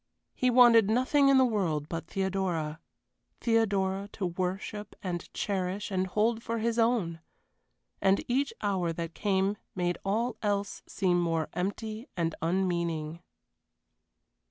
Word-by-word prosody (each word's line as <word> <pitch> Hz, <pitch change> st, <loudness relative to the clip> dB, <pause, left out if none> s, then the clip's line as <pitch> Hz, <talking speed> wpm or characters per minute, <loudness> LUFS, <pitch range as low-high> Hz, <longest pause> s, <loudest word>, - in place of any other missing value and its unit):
He 255 Hz, -, +1 dB
wanted 235 Hz, -4 st, +7 dB
nothing 260 Hz, +5 st, +3 dB
in 275 Hz, -, +6 dB
the 260 Hz, -, +6 dB
world 175 Hz, -, 0 dB
but 165 Hz, 0 st, -5 dB
Theodora. 185 Hz, -5 st, -2 dB, 0.6 s
Theodora 200 Hz, -4 st, +1 dB
to 195 Hz, -, -3 dB
worship 190 Hz, +4 st, -3 dB
and 175 Hz, -2 st, -4 dB
cherish 195 Hz, 0 st, -2 dB
and 190 Hz, 0 st, 0 dB
hold 220 Hz, +4 st, +1 dB
for 230 Hz, 0 st, -3 dB
his 230 Hz, +1 st, 0 dB
own. 225 Hz, -8 st, +1 dB, 0.8 s
And 195 Hz, 0 st, +3 dB
each 275 Hz, +3 st, +1 dB
hour 190 Hz, -4 st, 0 dB
that 165 Hz, 0 st, -5 dB
came 195 Hz, +1 st, 0 dB, 0.2 s
made 175 Hz, -2 st, -1 dB
all 225 Hz, +4 st, 0 dB
else 205 Hz, -2 st, -1 dB
seem 180 Hz, -3 st, +1 dB
more 165 Hz, -2 st, 0 dB
empty 215 Hz, +6 st, -3 dB
and 165 Hz, -1 st, 0 dB
unmeaning. 170 Hz, -2 st, -1 dB
195 Hz, 130 wpm, -29 LUFS, 175-225 Hz, 0.8 s, wanted